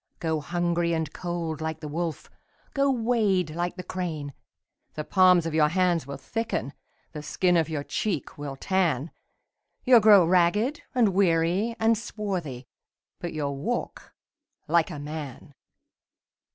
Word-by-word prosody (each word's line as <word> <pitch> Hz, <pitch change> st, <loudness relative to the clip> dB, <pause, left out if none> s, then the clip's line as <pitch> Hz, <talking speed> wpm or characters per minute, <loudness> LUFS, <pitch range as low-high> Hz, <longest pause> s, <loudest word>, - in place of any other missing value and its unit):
Go 160 Hz, -2 st, -1 dB
hungry 170 Hz, +1 st, 0 dB
and 160 Hz, -3 st, -2 dB
cold 170 Hz, -3 st, -4 dB
like 160 Hz, 0 st, -3 dB
the 150 Hz, -, -6 dB
wolf. 165 Hz, +2 st, -4 dB, 0.5 s
Go 275 Hz, 0 st, +2 dB
wade 220 Hz, -, +1 dB
like 175 Hz, +2 st, -3 dB
the 180 Hz, -, -7 dB
crane: 160 Hz, -7 st, -4 dB, 0.6 s
The 150 Hz, -, -3 dB
palms 180 Hz, -1 st, +4 dB
of 165 Hz, -, -3 dB
your 155 Hz, -1 st, +4 dB
hand 175 Hz, -3 st, +1 dB
will 140 Hz, 0 st, -6 dB
thicken. 210 Hz, -, -3 dB, 0.4 s
The 150 Hz, -, -7 dB
skin 180 Hz, +4 st, +1 dB
of 165 Hz, -1 st, +2 dB
your 150 Hz, -3 st, -3 dB
cheek 175 Hz, -1 st, -3 dB
will 145 Hz, -2 st, -6 dB
tan, 165 Hz, -3 st, 0 dB, 0.7 s
You'll 250 Hz, -2 st, +8 dB
grow 210 Hz, -4 st, +7 dB
ragged 185 Hz, -, +2 dB
and 235 Hz, -4 st, +4 dB
weary 185 Hz, +3 st, +2 dB
and 225 Hz, +1 st, +4 dB
swarthy. 185 Hz, -, -5 dB, 0.5 s
But 175 Hz, -, -4 dB
you'll 140 Hz, -3 st, -3 dB
walk 140 Hz, -, -4 dB, 0.5 s
like 170 Hz, +2 st, +3 dB
a 160 Hz, -, -6 dB
man 145 Hz, -1 st, -7 dB
170 Hz, 140 wpm, -26 LUFS, 155-190 Hz, 0.7 s, You'll